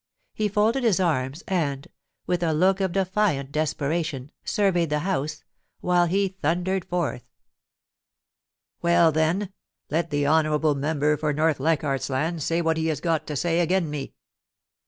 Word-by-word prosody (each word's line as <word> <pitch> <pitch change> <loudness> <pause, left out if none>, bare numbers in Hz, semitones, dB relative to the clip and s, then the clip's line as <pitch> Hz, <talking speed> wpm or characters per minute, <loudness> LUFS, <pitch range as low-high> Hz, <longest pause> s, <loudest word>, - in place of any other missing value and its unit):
He 215 - 0
folded 215 +6 +1
his 215 -6 +3
arms, 150 -4 0
and, 150 -5 -1 0.4
with 180 -1 -1
a 165 -2 +1
look 190 +4 +3
of 190 -2 0
defiant 185 -7 0
desperation, 150 -2 -2
surveyed 180 -5 +1
the 150 0 0
House, 155 -5 -2 0.4
while 175 -1 +2
he 195 +3 +1
thundered 175 +4 0
forth: 170 -8 -2 0.8
* - - -62
Well, 170 -1 +4
then, 170 +6 0 0.4
let 165 +2 0
the 145 -1 0
honourable 155 0 +3
member 150 +1 0
for 150 -1 -1
North 155 0 +1
Leichardt's 145 -2 0
Land 155 +5 -1
say 165 +4 0
what 160 0 +1
he 160 0 0
has 155 -3 -1
got 165 -1 -1
to 150 - -4
say 170 +4 +1
agen 175 -2 +1
me.' 145 -2 -5
160 Hz, 155 wpm, -25 LUFS, 150-180 Hz, 0.8 s, Well